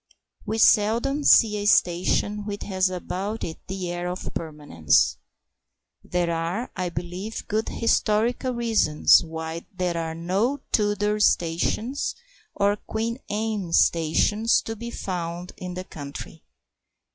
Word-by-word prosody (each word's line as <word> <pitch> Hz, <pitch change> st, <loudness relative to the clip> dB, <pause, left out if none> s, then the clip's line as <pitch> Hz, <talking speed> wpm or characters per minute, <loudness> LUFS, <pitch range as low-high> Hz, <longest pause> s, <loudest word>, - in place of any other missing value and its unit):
We 220 Hz, -, -1 dB
seldom 230 Hz, +7 st, +3 dB
see 215 Hz, -6 st, +6 dB
a 205 Hz, 0 st, -2 dB
station 195 Hz, +3 st, +2 dB
which 205 Hz, -1 st, -5 dB
has 190 Hz, -1 st, +1 dB
about 190 Hz, +4 st, -4 dB
it 160 Hz, -, -5 dB
the 185 Hz, -2 st, -4 dB
air 175 Hz, 0 st, -3 dB
of 180 Hz, +1 st, -5 dB
permanence. 145 Hz, -, +1 dB, 0.9 s
There 175 Hz, -1 st, -1 dB
are, 170 Hz, +8 st, -2 dB
I 180 Hz, -1 st, -2 dB
believe 175 Hz, +6 st, -6 dB
good 220 Hz, +2 st, -1 dB
historical 230 Hz, +3 st, +1 dB
reasons 225 Hz, -13 st, +4 dB
why 160 Hz, 0 st, -6 dB
there 180 Hz, -3 st, -2 dB
are 160 Hz, -1 st, -3 dB
no 195 Hz, +12 st, 0 dB
Tudor 210 Hz, 0 st, +1 dB
stations 210 Hz, +8 st, +1 dB, 0.4 s
or 205 Hz, 0 st, +2 dB
Queen 225 Hz, +4 st, -3 dB
Anne 210 Hz, -4 st, -2 dB
stations 170 Hz, +9 st, +3 dB
to 225 Hz, -, -5 dB
be 235 Hz, +2 st, -7 dB
found 175 Hz, -4 st, -5 dB
in 180 Hz, -1 st, -6 dB
the 185 Hz, -, -4 dB
country. 145 Hz, -5 st, -9 dB
190 Hz, 125 wpm, -25 LUFS, 170-220 Hz, 0.9 s, see